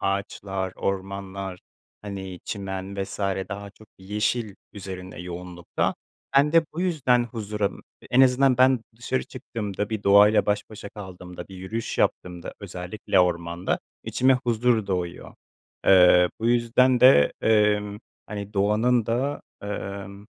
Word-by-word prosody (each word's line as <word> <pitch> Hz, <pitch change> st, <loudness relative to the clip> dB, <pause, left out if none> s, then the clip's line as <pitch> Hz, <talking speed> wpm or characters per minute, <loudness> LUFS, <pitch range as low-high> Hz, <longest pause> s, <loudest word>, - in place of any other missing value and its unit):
ağaçlar, 95 Hz, -1 st, -2 dB
ormanlar, 95 Hz, -1 st, -4 dB, 0.4 s
hani, 95 Hz, -3 st, -7 dB
çimen 95 Hz, -1 st, -4 dB
vs. 95 Hz, -, -7 dB, 0.3 s
daha 100 Hz, 0 st, -6 dB
çok 110 Hz, +1 st, -19 dB
yeşil 105 Hz, +2 st, -1 dB, 0.2 s
üzerinde 95 Hz, -3 st, -8 dB
yoğunlukta. 90 Hz, 0 st, -3 dB, 0.4 s
Ben 145 Hz, +2 st, +5 dB
de 165 Hz, -1 st, +5 dB
bu 165 Hz, -, -4 dB
yüzden 135 Hz, -9 st, +2 dB
huzura 105 Hz, -3 st, -2 dB, 0.4 s
En 125 Hz, -, +5 dB
azından 130 Hz, 0 st, +5 dB
ben 130 Hz, -1 st, +5 dB, 0.2 s
dışarı 125 Hz, +2 st, -2 dB
çıktığımda, 105 Hz, -5 st, -5 dB
bir 110 Hz, -2 st, -3 dB
doğayla 100 Hz, +2 st, +6 dB
baş 105 Hz, 0 st, -1 dB
başa 105 Hz, -1 st, -8 dB
kaldığımda, 90 Hz, -3 st, -9 dB
bir 95 Hz, -, -10 dB
yürüyüş 110 Hz, +5 st, -4 dB
yaptığımda, 90 Hz, -1 st, -1 dB
özellikle 95 Hz, 0 st, -1 dB
ormanda 85 Hz, 0 st, 0 dB, 0.3 s
içime 130 Hz, +1 st, +3 dB
huzur 120 Hz, -3 st, +1 dB
doğuyor. 90 Hz, -3 st, -4 dB, 0.5 s
Eee, 90 Hz, -1 st, +7 dB
bu 115 Hz, -, 0 dB
yüzden 120 Hz, +1 st, +3 dB
de, 125 Hz, -, +7 dB
emm, 105 Hz, -1 st, +2 dB, 0.3 s
hani, 105 Hz, 0 st, -7 dB
doğanın 105 Hz, +4 st, +2 dB
da, 135 Hz, +5 st, -1 dB, 0.2 s
emm, 100 Hz, 0 st, -6 dB
100 Hz, 125 wpm, -25 LUFS, 95-115 Hz, 0.5 s, Eee